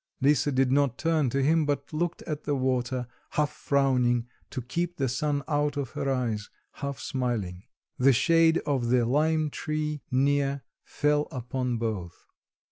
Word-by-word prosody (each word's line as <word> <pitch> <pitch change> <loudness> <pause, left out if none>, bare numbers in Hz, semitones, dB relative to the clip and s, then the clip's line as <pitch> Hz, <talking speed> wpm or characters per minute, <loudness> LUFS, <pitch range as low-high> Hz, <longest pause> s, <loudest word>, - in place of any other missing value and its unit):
Lisa 145 +1 +3
did 130 -1 +2
not 140 -2 +2
turn 160 -5 +1
to 135 +3 0
him, 160 +3 +3
but 145 +1 -2
looked 170 +2 -2
at 150 -1 -4
the 145 - 0
water, 130 -1 0 0.3
half 150 -1 +1
frowning, 125 -4 +2 0.2
to 130 - -4
keep 170 +8 -3
the 135 - +1
sun 145 +3 -1
out 145 -1 0
of 140 -4 -3
her 135 - -2
eyes, 115 -5 -1 0.2
half 140 -1 -5
smiling. 110 -8 -3 0.3
The 135 +2 +6
shade 165 +5 +4
of 135 -5 0
the 125 -1 +3
lime 155 +4 +2
tree 150 -1 -3
near 140 +1 +1 0.2
fell 150 0 +1
upon 125 -2 -2
both. 105 -7 -4
140 Hz, 155 wpm, -27 LUFS, 125-150 Hz, 0.3 s, The